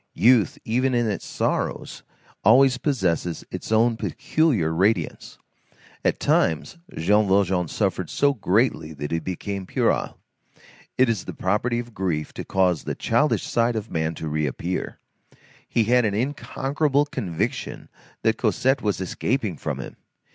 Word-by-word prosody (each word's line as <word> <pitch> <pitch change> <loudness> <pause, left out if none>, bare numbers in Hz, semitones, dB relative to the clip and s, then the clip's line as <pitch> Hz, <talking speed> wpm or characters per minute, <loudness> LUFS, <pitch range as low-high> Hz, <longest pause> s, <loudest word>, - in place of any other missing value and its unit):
Youth, 115 +2 +4
even 125 +3 +1
in 120 -1 +2
its 105 - -3
sorrows, - - -2 0.4
always 130 +4 +5
possesses 90 - -1
its - - -6
own 115 +1 +3
peculiar 135 - 0
radiance. 95 0 0 0.7
At - - +1
times, 80 - +1 0.2
Jean 105 0 +3
Valjean 95 -2 +2
suffered - - -1
so 140 0 +2
greatly 105 - +1
that 75 0 -6
he 85 - +1
became 95 +3 -5
puerile. - - 0 0.8
It 130 - +5
is 115 -5 -1
the - - -7
property 105 +5 0
of 120 -1 -5
grief 85 -7 -2
to - - -6
cause 90 -4 +1
the - - -3
childish - - +1
side 115 0 +1
of 110 -2 -4
man 80 0 -1
to 80 - -5
reappear. 75 +4 -2 0.7
He 115 - +2
had 125 +3 +3
an 105 -2 0
unconquerable 140 +3 0
conviction 100 - -3 0.4
that - - +2
Cosette 135 +2 +1
was 105 -3 -1
escaping 105 +1 -1
from - - -4
him. - - -8
105 Hz, 140 wpm, -24 LUFS, 90-125 Hz, 0.8 s, always